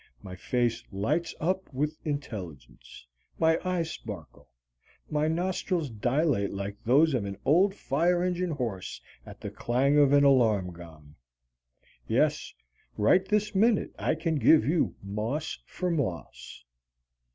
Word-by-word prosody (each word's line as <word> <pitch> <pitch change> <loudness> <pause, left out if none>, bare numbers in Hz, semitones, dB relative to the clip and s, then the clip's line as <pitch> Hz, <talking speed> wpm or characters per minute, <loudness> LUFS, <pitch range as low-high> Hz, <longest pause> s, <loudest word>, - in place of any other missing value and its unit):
My 90 - -8
face 120 +3 -1
lights 145 - -1
up 185 +3 -1
with 150 +3 -2
intelligence. 95 - -7 0.3
My 160 0 +3
eyes 180 -3 -1
sparkle. 100 -9 -9 0.6
My 150 0 +1
nostrils 170 -2 -1
dilate 120 0 +1
like 100 +1 -5
those 145 +6 +4
of 125 -5 0
an 100 -1 -5
old 190 +6 +4
fire 175 +4 +1
engine 180 0 -1
horse 120 - -4 0.3
at - - -12
the - - -5
clang 135 +5 +1
of 140 -2 +5
an 145 0 +5
alarm 110 -10 +3
gong. 80 -4 -13 0.9
Yes, - - +1 0.5
right 145 - +4
this 210 0 0
minute 215 +2 +2
I - - +1
can 160 0 -1
give 150 -2 +5
you 160 +4 +1
moss 110 +10 -3
for 180 -1 -3
moss. 95 - -4
140 Hz, 130 wpm, -28 LUFS, 105-165 Hz, 0.9 s, of